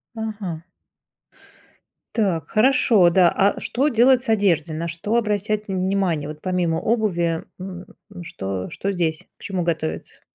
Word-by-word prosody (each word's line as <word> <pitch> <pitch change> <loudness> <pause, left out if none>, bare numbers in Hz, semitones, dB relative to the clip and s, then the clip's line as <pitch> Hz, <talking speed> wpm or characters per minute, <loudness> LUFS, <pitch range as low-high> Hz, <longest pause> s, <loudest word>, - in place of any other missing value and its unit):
Ага. 210 -7 -5 1.5
Так, 190 -8 0
хорошо, 225 -5 +4
да. 175 0 +5
А 200 +3 +1
что 270 +4 0
делать 250 0 +4
с 260 - -5
одеждой? 185 -8 +2
На 165 +2 -3
что 170 +7 -3
обращать 210 -1 0
внимание 185 -5 0
вот 150 0 -8
помимо 180 -3 0
обуви, 175 -7 0 0.2
м? 185 -1 -7 0.4
Что 95 - -5
что 200 - -3
здесь? 165 -4 -2
К - - -18
чему 185 -3 -2
готовиться? 155 - -3
185 Hz, 135 wpm, -22 LUFS, 165-215 Hz, 1.5 s, да